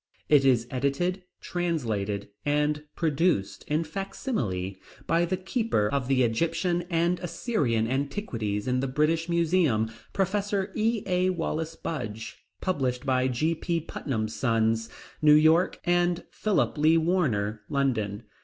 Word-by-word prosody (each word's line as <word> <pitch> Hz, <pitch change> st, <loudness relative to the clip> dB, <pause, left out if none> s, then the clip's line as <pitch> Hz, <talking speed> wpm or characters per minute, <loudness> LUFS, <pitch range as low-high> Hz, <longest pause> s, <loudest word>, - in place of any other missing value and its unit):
It 145 Hz, -2 st, +6 dB
is 125 Hz, -4 st, +3 dB
edited, 140 Hz, +8 st, 0 dB, 0.2 s
translated, 110 Hz, -, -2 dB
and 150 Hz, +1 st, +1 dB, 0.2 s
reproduced 160 Hz, -, 0 dB
in 155 Hz, +2 st, +1 dB
fac 195 Hz, +5 st, -6 dB
simile 95 Hz, -, -2 dB, 0.3 s
by 170 Hz, +1 st, +2 dB
the 185 Hz, +2 st, -1 dB
keeper 190 Hz, -, 0 dB
of 140 Hz, -1 st, -1 dB
the 130 Hz, -1 st, +3 dB
Egyptian 165 Hz, +8 st, 0 dB
and 170 Hz, +1 st, +1 dB
Assyrian 155 Hz, -, 0 dB
Antiquities 130 Hz, -, -2 dB
in 125 Hz, 0 st, +1 dB
the 135 Hz, -, -1 dB
British 155 Hz, +5 st, +1 dB
Museum, 165 Hz, -10 st, +2 dB, 0.2 s
Professor 195 Hz, 0 st, 0 dB
E.A. 205 Hz, -5 st, +1 dB
Wallis 165 Hz, -2 st, -2 dB
Budge; 115 Hz, -8 st, -5 dB, 0.2 s
published 130 Hz, -9 st, -1 dB
by 130 Hz, -1 st, +2 dB
G.P. 165 Hz, +6 st, 0 dB
Putnam's 110 Hz, -8 st, -3 dB
Sons, 115 Hz, -2 st, +1 dB, 0.3 s
New 150 Hz, -1 st, +7 dB
York, 160 Hz, +4 st, +4 dB
and 175 Hz, 0 st, +2 dB
Philip 210 Hz, -7 st, 0 dB
Lee 155 Hz, +2 st, +5 dB
Warner, 125 Hz, -, +1 dB
London. 120 Hz, -7 st, 0 dB
150 Hz, 125 wpm, -27 LUFS, 120-175 Hz, 0.3 s, New